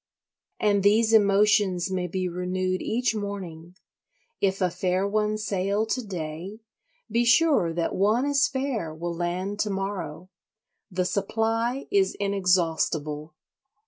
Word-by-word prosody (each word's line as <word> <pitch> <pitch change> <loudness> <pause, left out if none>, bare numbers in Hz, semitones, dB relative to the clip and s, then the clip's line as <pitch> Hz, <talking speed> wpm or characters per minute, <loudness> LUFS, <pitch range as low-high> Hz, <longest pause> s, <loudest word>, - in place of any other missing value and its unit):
And 205 -2 +2
these 220 +3 +3
emotions 200 -3 +3
may 180 -1 -1
be 185 +1 -2
renewed 185 +1 -2
each 245 +1 0
morning; 185 -5 -6 0.6
if 195 -1 +1
a 180 -2 +1
fair 185 +2 0
one 210 +1 0
sail 200 0 -1
to 250 +3 -2
day, 180 +2 -6 0.5
be 235 +2 +2
sure 240 - +4
that 165 0 -2
one 215 +7 +2
as 285 -1 +3
fair 260 - -2
will 170 +2 -4
land 180 +4 -3
to 210 - 0
morrow. 190 -3 -4 0.6
The 185 -2 -1
supply 225 +6 -1
is 390 -1 +2
inexhaustible. 165 -6 0
195 Hz, 125 wpm, -26 LUFS, 180-215 Hz, 0.6 s, sure